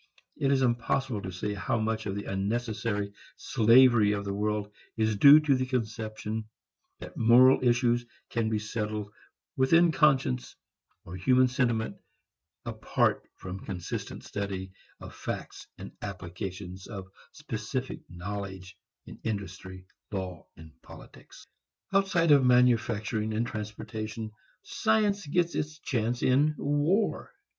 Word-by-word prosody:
It 135 Hz, -1 st, +1 dB
is 135 Hz, -1 st, +3 dB
impossible 120 Hz, -1 st, 0 dB
to 95 Hz, -, -5 dB
say 95 Hz, +3 st, -3 dB
how 100 Hz, +4 st, -1 dB
much 110 Hz, 0 st, -1 dB
of 100 Hz, -, -3 dB
the 100 Hz, -, -5 dB
unnecessary 105 Hz, 0 st, -2 dB, 0.2 s
slavery 115 Hz, -2 st, +5 dB
of 100 Hz, -1 st, -3 dB
the 100 Hz, -, -2 dB
world 105 Hz, 0 st, -2 dB, 0.2 s
is 110 Hz, -1 st, +1 dB
due 140 Hz, +8 st, +9 dB
to 150 Hz, -2 st, +3 dB
the 130 Hz, -1 st, 0 dB
conception 110 Hz, -3 st, -3 dB, 0.5 s
that -, -, -10 dB
moral 125 Hz, +3 st, +6 dB
issues 120 Hz, 0 st, +3 dB, 0.3 s
can 115 Hz, -1 st, 0 dB
be 110 Hz, -, 0 dB
settled 105 Hz, -1 st, -4 dB, 0.4 s
within 165 Hz, +6 st, +4 dB
conscience 130 Hz, -, +2 dB, 0.5 s
or 85 Hz, -, -8 dB
human 130 Hz, +7 st, +4 dB
sentiment 120 Hz, -3 st, 0 dB, 0.7 s
apart -, -, 0 dB
from 95 Hz, 0 st, -7 dB
consistent 90 Hz, -3 st, -5 dB
study 95 Hz, -2 st, -4 dB, 0.3 s
of -, -, -10 dB
facts -, -, -6 dB
and -, -, -9 dB
application 95 Hz, -1 st, -6 dB
of 100 Hz, -4 st, -6 dB, 0.3 s
specific 130 Hz, -2 st, -5 dB
knowledge 95 Hz, +1 st, -6 dB, 0.3 s
in -, -, -11 dB
industry, 95 Hz, -3 st, -5 dB, 0.3 s
law 95 Hz, -4 st, -5 dB
and 80 Hz, -1 st, -13 dB
politics. -, -, -14 dB, 0.5 s
Outside 185 Hz, -5 st, +3 dB
of 140 Hz, -2 st, +7 dB
manufacturing 115 Hz, -3 st, +2 dB
and 115 Hz, +2 st, 0 dB
transportation, 110 Hz, 0 st, -6 dB, 0.3 s
science 215 Hz, -5 st, +1 dB
gets 170 Hz, +3 st, +1 dB
its 155 Hz, +1 st, -3 dB
chance 120 Hz, -5 st, -2 dB
in 145 Hz, +4 st, +3 dB
war. 145 Hz, +9 st, 0 dB
110 Hz, 125 wpm, -28 LUFS, 100-130 Hz, 0.7 s, due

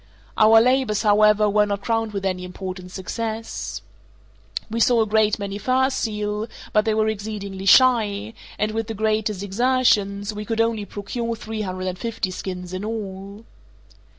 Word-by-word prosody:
Our 220 Hz, +1 st, +7 dB
labours, 250 Hz, -3 st, +2 dB
however, 210 Hz, 0 st, +5 dB
were 210 Hz, 0 st, +3 dB
not 200 Hz, -1 st, -3 dB
crowned 225 Hz, -1 st, 0 dB
with 200 Hz, -1 st, -4 dB
any 185 Hz, -1 st, -1 dB
important 185 Hz, 0 st, -7 dB
success. 225 Hz, +4 st, -5 dB, 0.8 s
We 230 Hz, +1 st, -3 dB
saw 230 Hz, 0 st, +4 dB
a -, -, -2 dB
great 215 Hz, 0 st, +2 dB
many 200 Hz, -1 st, -5 dB
fur 260 Hz, +4 st, +2 dB
seal, 210 Hz, -3 st, -2 dB, 0.3 s
but 215 Hz, +1 st, +3 dB
they 220 Hz, -1 st, +1 dB
were 215 Hz, 0 st, +2 dB
exceedingly 200 Hz, -2 st, -4 dB
shy, 220 Hz, -4 st, +4 dB, 0.2 s
and 215 Hz, 0 st, 0 dB
with 225 Hz, 0 st, -3 dB
the 225 Hz, -, -5 dB
greatest 215 Hz, -2 st, 0 dB
exertions, 210 Hz, -2 st, +1 dB
we 210 Hz, 0 st, -5 dB
could 225 Hz, +1 st, -3 dB
only 225 Hz, -2 st, +1 dB
procure 230 Hz, +4 st, -4 dB
three 220 Hz, 0 st, -5 dB
hundred 185 Hz, -2 st, -4 dB
and 185 Hz, -1 st, -3 dB
fifty 225 Hz, -5 st, -3 dB
skins 180 Hz, -1 st, -6 dB
in 185 Hz, +2 st, -4 dB
all. 205 Hz, -1 st, -6 dB
210 Hz, 160 wpm, -23 LUFS, 200-225 Hz, 0.8 s, Our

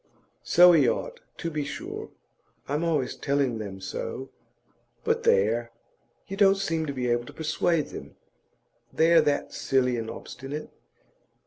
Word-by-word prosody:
'So 180 Hz, +1 st, +7 dB
he 145 Hz, -8 st, +5 dB
ought, -, -, -3 dB, 0.2 s
to 165 Hz, -, -4 dB
be 150 Hz, -1 st, -2 dB
sure. 140 Hz, -, -6 dB, 0.6 s
I'm 150 Hz, +3 st, -1 dB
always 150 Hz, -7 st, 0 dB
telling 140 Hz, -5 st, 0 dB
them 100 Hz, -3 st, -6 dB
so. 130 Hz, +7 st, -5 dB, 0.7 s
But -, -, +1 dB
there! 115 Hz, +4 st, +2 dB, 0.6 s
you 195 Hz, -, -5 dB
don't 195 Hz, -1 st, +5 dB
seem 165 Hz, -5 st, -1 dB
to -, -, -1 dB
be 130 Hz, -3 st, -2 dB
able 120 Hz, 0 st, +1 dB
to -, -, -10 dB
persuade 160 Hz, 0 st, 0 dB
them, -, -, -9 dB, 0.8 s
they're 165 Hz, +1 st, +5 dB
that 145 Hz, -1 st, -1 dB
silly 125 Hz, -2 st, +1 dB
and 110 Hz, -1 st, -4 dB
obstinate. 140 Hz, +6 st, -7 dB
140 Hz, 140 wpm, -27 LUFS, 120-165 Hz, 0.8 s, So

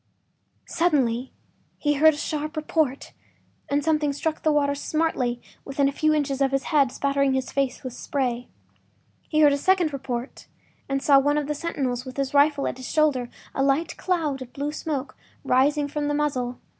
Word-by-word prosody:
Suddenly 265 Hz, -7 st, +1 dB, 0.5 s
he 295 Hz, -1 st, +1 dB
heard 310 Hz, +2 st, +5 dB
a -, -, -9 dB
sharp 305 Hz, 0 st, -3 dB
report 305 Hz, -3 st, -1 dB, 0.6 s
and 285 Hz, +1 st, +1 dB
something 305 Hz, -2 st, +1 dB
struck 315 Hz, +2 st, -2 dB
the 310 Hz, -, +2 dB
water 285 Hz, -1 st, +2 dB
smartly 285 Hz, -5 st, -1 dB, 0.2 s
within 275 Hz, 0 st, 0 dB
a -, -, +1 dB
few 310 Hz, +2 st, +1 dB
inches 280 Hz, -3 st, 0 dB
of 270 Hz, -, +4 dB
his 275 Hz, 0 st, 0 dB
head, 280 Hz, -5 st, +2 dB
spattering 275 Hz, -1 st, +1 dB
his 265 Hz, -1 st, -2 dB
face 275 Hz, -2 st, -1 dB
with 255 Hz, -2 st, -5 dB
spray. 250 Hz, -2 st, -2 dB, 0.8 s
He 310 Hz, -1 st, +2 dB
heard 290 Hz, -2 st, +6 dB
a 280 Hz, -, -1 dB
second 355 Hz, -2 st, +2 dB
report, 255 Hz, -2 st, -5 dB, 0.4 s
and 275 Hz, 0 st, -1 dB
saw 280 Hz, -2 st, +6 dB
one 290 Hz, +2 st, +2 dB
of 295 Hz, -, 0 dB
the 300 Hz, -, -2 dB
sentinels 275 Hz, -6 st, -2 dB
with 255 Hz, 0 st, -9 dB
his 275 Hz, -1 st, -1 dB
rifle 285 Hz, 0 st, +4 dB
at -, -, -4 dB
his 255 Hz, -1 st, -7 dB
shoulder, 285 Hz, -6 st, +2 dB, 0.2 s
a -, -, -1 dB
light 275 Hz, +4 st, +1 dB
cloud 315 Hz, -7 st, -1 dB
of 250 Hz, -1 st, -9 dB
blue 285 Hz, +1 st, -3 dB
smoke 295 Hz, -3 st, -4 dB, 0.3 s
rising 285 Hz, +3 st, +2 dB
from 295 Hz, 0 st, -3 dB
the 290 Hz, -, 0 dB
muzzle. 255 Hz, -5 st, -1 dB
280 Hz, 180 wpm, -25 LUFS, 265-300 Hz, 0.8 s, heard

